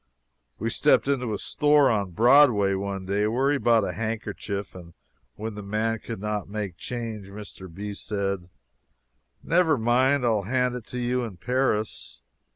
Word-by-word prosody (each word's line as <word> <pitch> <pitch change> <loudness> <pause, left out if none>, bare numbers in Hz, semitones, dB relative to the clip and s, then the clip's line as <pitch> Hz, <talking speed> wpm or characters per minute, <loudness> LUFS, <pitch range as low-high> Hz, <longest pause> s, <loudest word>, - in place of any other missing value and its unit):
We - - -2
stepped - - +3
into 125 -5 0
a 105 - -1
store 145 +1 +3
on 100 -4 0
Broadway 115 - +5
one 95 0 -3
day, 100 +2 +1
where 130 +6 +1
he 145 - +1
bought 115 -4 +4
a - - -2
handkerchief, 105 -3 -4
and 85 -2 -12 0.4
when 110 +1 -5
the 105 - -7
man 110 +2 -1
could 115 -2 -7
not 105 -1 -3
make 100 -4 -4
change, 115 -2 -5
Mr. 100 -3 -10
B. 100 +4 -6
said: 100 -3 -3 0.9
"Never 165 -3 +3
mind, 125 +4 +2
I'll 110 -3 +2
hand 125 +4 0
it 125 -3 -7
to 125 - -6
you 125 +1 0
in 110 -6 -7
Paris." 105 - -2
110 Hz, 160 wpm, -25 LUFS, 100-125 Hz, 0.9 s, Broadway